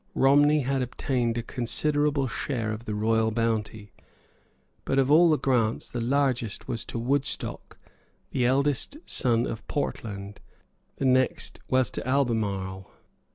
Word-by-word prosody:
Romney 145 +3 +5
had 135 0 -1
obtained 125 -1 -1
a 120 - -2
considerable 145 +3 0
share 115 -2 -3
of 110 +2 -6
the 105 - -3
royal 110 +1 +2
bounty. 110 -2 -2 0.9
But 135 - -1
of 135 +1 +3
all 170 +3 +7
the 155 - +4
grants 120 -6 0
the 120 - -3
largest 125 -3 0
was 115 -3 -2
to - - -5
Woodstock, 135 +4 -1 0.5
the 125 - 0
eldest 140 - +1
son 120 -3 +1
of 110 - -6
Portland; 100 -8 -4 0.6
the - - -3
next 130 -1 +1
was 130 -3 +2
to - - -5
Albemarle. 105 -8 -1
125 Hz, 135 wpm, -26 LUFS, 110-140 Hz, 0.9 s, all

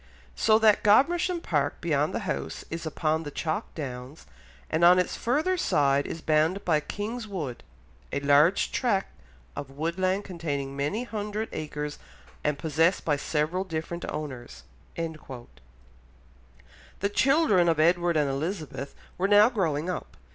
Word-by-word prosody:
"So 220 0 +4
that 220 -2 +4
Godmersham 340 - +3
Park, - - -1
beyond - - +1
the - - -3
house, - - -4
is 165 0 -4
upon 155 0 0
the 150 - -6
chalk 155 +2 -3
downs, 130 -1 -7 0.4
and 160 +2 0
on 180 +1 +8
its 180 - 0
further 310 +10 0
side 140 - +2
is 165 - -6
bounded 160 +6 +1
by 160 -3 +3
King's 215 +8 -5
Wood, 155 - -5 0.5
a - - -1
large 145 +6 +4
tract 210 -7 0 0.5
of 140 - -6
woodland 185 +7 -1
containing 145 -7 -4
many 145 - -1
hundred 215 -1 -4
acres 150 -1 -5 0.4
and 150 -1 0
possessed 165 +4 +1
by 150 - +2
several 155 +5 -1
different 170 -1 -5
owners." 130 -5 -6 0.3
The 155 -7 -6 1.7
children 270 - +4
of 165 -2 +1
Edward 170 +1 +3
and 150 -2 +2
Elizabeth 140 -1 -4 0.2
were 190 - +2
now 205 +2 +7
growing 165 - -1
up. 180 - -5
165 Hz, 140 wpm, -27 LUFS, 150-200 Hz, 1.7 s, on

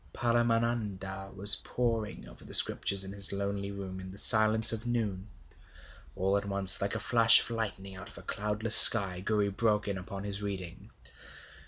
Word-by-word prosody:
Paramananda 115 -5 -5
was 100 +2 +5
poring 115 -3 -7
over - - -19
the - - +4
scriptures 100 -1 +4
in 95 - -10
his 100 -1 +5
lonely 100 0 -7
room 95 -2 -11
in 95 0 -13
the 95 - -15
silence 110 +1 +3
of 115 +2 -10
noon. 105 -5 -7 0.9
All 95 +2 -4
at 100 - -8
once, 100 -1 +4
like 100 +2 -6
a - - -6
flash 115 +1 +3
of - - -10
lightning 100 -4 -9
out 100 +2 -14
of - - -17
a - - -15
cloudless 105 +2 -3
sky, 95 -5 +6
Gouri 105 -1 -4
broke 105 +1 -4
in 100 -2 -7
upon 95 +1 -12
his 100 0 -6
reading. 95 -4 -11
100 Hz, 175 wpm, -26 LUFS, 95-110 Hz, 0.9 s, sky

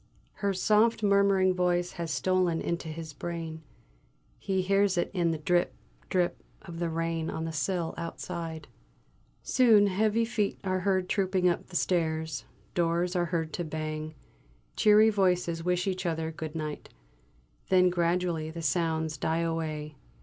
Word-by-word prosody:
Her 200 -1 +2
soft 215 +4 +3
murmuring 200 -2 +4
voice 180 -1 +1
has 170 -1 -5
stolen 180 0 +1
into 170 -1 -3
his 160 -1 -7
brain; 165 0 -5 0.8
he 190 -1 -1
hears 195 0 +2
it 175 - 0
in 175 -3 +1
the 165 - -1
drip, 175 +3 +1 0.3
drip 180 -2 0 0.2
of 170 -2 -8
the 170 -1 -1
rain 165 0 -2
on 160 - -3
the 165 - -3
sill 165 +2 -1
outside. 165 -2 -5 0.8
Soon 225 -5 +5
heavy 215 +3 +2
feet 220 -3 -1
are 185 -1 0
heard 185 -1 +1
trooping 185 -2 +1
up 175 - 0
the 180 - -12
stairs; 160 -4 0 0.3
doors 175 +1 0
are 175 -1 +2
heard 165 -2 -2
to 175 - -2
bang; 155 0 -4 0.6
cheery 215 +1 +6
voices 180 -4 +1
wish 180 0 0
each 185 -2 -2
other 160 -1 -2
good 160 0 -7
night. 155 -2 -5 0.8
Then 185 -1 +5
gradually 170 -2 0
the 165 +1 -7
sounds 160 -1 0
die 160 +4 0
away. 155 -3 -3
175 Hz, 150 wpm, -29 LUFS, 160-185 Hz, 0.8 s, cheery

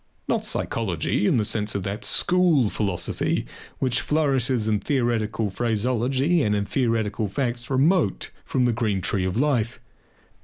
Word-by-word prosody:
Not - - 0
psychology 100 -1 -1
in - - +3
the 110 - +1
sense 105 -1 -2
of 100 - -2
that 100 +4 -4
school 175 - +3
philosophy 100 -5 -1 0.3
which 130 -2 0
flourishes 135 -6 +1
in 105 -1 +1
theoretical 115 -4 -1
phraseology 125 - +1
and 105 -5 +1
in 100 0 -1
theoretical 110 -4 0
facts 120 +3 -3
remote 145 - +1
from 125 -2 0
the 120 - +2
green 110 -4 -1
tree 95 0 0
of 95 +3 -2
life. 125 -4 0
115 Hz, 145 wpm, -24 LUFS, 105-130 Hz, 0.3 s, in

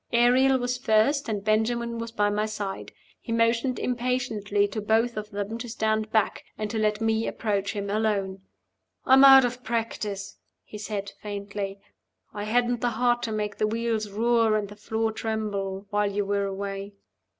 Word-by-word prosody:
Ariel 255 +3 +5
was 245 0 -2
first, 245 +4 +2
and 205 -2 -2
Benjamin 230 +2 0
was 230 0 -5
by 205 -2 +1
my 210 +1 0
side. 200 -2 -5 0.3
He 230 - -8
motioned 230 +2 +2
impatiently 235 -5 0
to 215 +2 -4
both 225 +3 +1
of 210 0 -5
them 205 +2 -4
to 240 - -6
stand 220 -1 -1
back, 220 -2 +1
and 215 -1 -3
to 225 - -2
let 210 0 +1
me 225 0 +1
approach 200 -2 -1
him 200 -1 -4
alone. 200 -2 -1 0.6
"I'm 265 +1 +7
out 270 -1 +9
of 250 +1 -4
practice," 215 -4 -3 0.2
he 210 - -10
said, 205 -1 -4
faintly. 200 -1 -5 0.5
"I 205 -1 -4
hadn't 240 +2 +1
the 245 - +2
heart 240 +1 +1
to 225 - -3
make 210 -1 -3
the 215 - +1
wheels 225 -1 -1
roar 225 +1 +2
and 205 -2 -3
the 205 - -10
floor 220 +1 -2
tremble 205 -3 -3
while 205 -1 +1
you 205 0 -1
were 200 0 0
away." 195 +1 -5
215 Hz, 175 wpm, -26 LUFS, 205-235 Hz, 0.6 s, out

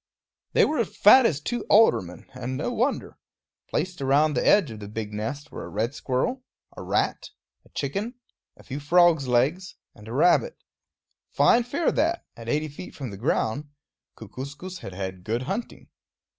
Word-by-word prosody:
They - - +5
were 295 -6 +1
fat 230 +4 +6
as 150 -8 -1
two 240 +10 -3
aldermen; 95 - +3
and 130 0 -4
no 155 - -2
wonder. 245 +4 -2 0.5
Placed 180 -4 -2
around 145 +3 +3
the 125 - 0
edge 195 - +4
of 110 - -8
the 100 - -8
big 105 0 -5
nest 135 +8 -5
were - - -7
a - - -8
red 115 +5 -2
squirrel, 195 - -2 0.3
a - - -8
rat, - - -1 0.4
a - - -21
chicken, 200 - -3 0.4
a - - -16
few 135 +1 -6
frogs' 165 -1 +4
legs, 140 +10 +1 0.2
and 105 - -15
a 115 - -6
rabbit. 180 - +3 0.7
Fine 240 0 +4
fare 285 +6 0
that, 335 +3 0
at 115 0 -8
eighty 155 +4 0
feet 150 +5 -10
from 130 -6 -6
the - - -7
ground. 120 +6 -1 0.5
Kookooskoos 140 - -8
had 95 - -8
had 95 -1 -5
good 115 +6 -2
hunting. 200 - -5
145 Hz, 170 wpm, -25 LUFS, 120-195 Hz, 0.7 s, fat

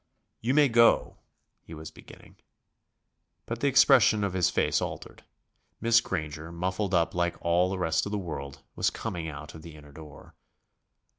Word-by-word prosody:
"You 125 +4 0
may 150 -1 +5
go 115 -1 +3 0.2
..." - - -51
he 80 - -9
was 80 0 -9
beginning. - - -16 1.1
But 115 0 -5
the 140 - 0
expression 125 -5 +5
of 100 -2 -2
his 90 -2 +2
face - - 0
altered. - - -7 0.6
Miss 115 0 +4
Granger, 80 -5 -5
muffled 95 +3 -2
up 85 -1 +1
like 85 -1 -1
all 85 +2 +2
the 95 - -3
rest 80 0 0
of - - -6
the 105 - -1
world, 70 -7 -7
was - - +1
coming 85 -3 -5
out 75 0 -9
of 80 - -11
the 80 -1 -12
inner 75 -1 -15
door. 75 0 -14
90 Hz, 170 wpm, -27 LUFS, 80-105 Hz, 1.1 s, may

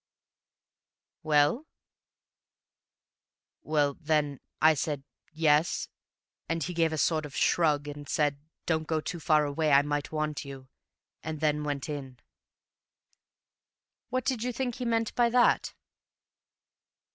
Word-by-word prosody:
"Well?" 155 - +2 1.9
"Well, 145 -2 +1
then, 150 -3 0 0.2
I 160 0 +6
said 145 -1 -3 0.3
'Yes,' 155 0 +2 0.6
and 165 -1 -1
he 180 - -4
gave 165 -1 +2
a 155 - -2
sort 155 +1 +1
of 150 -1 -9
shrug, 150 -4 +2
and 145 -1 -8
said, 145 -2 +1 0.3
'Don't 160 -1 0
go 160 -1 0
too 170 +3 -5
far 155 -1 +3
away, 150 +2 0
I 140 0 +6
might 145 0 -2
want 155 -1 -2
you'; 135 -2 -10 0.5
and 160 -1 -5
then 150 -1 +1
went 145 -2 -3
in." 135 -4 -6 1.9
"What 255 +1 -1
did 260 -4 0
you 250 +1 -1
think 245 0 -3
he 250 - -4
meant 230 -1 0
by 240 -1 +3
that?" 245 0 +3
155 Hz, 125 wpm, -29 LUFS, 145-165 Hz, 1.9 s, I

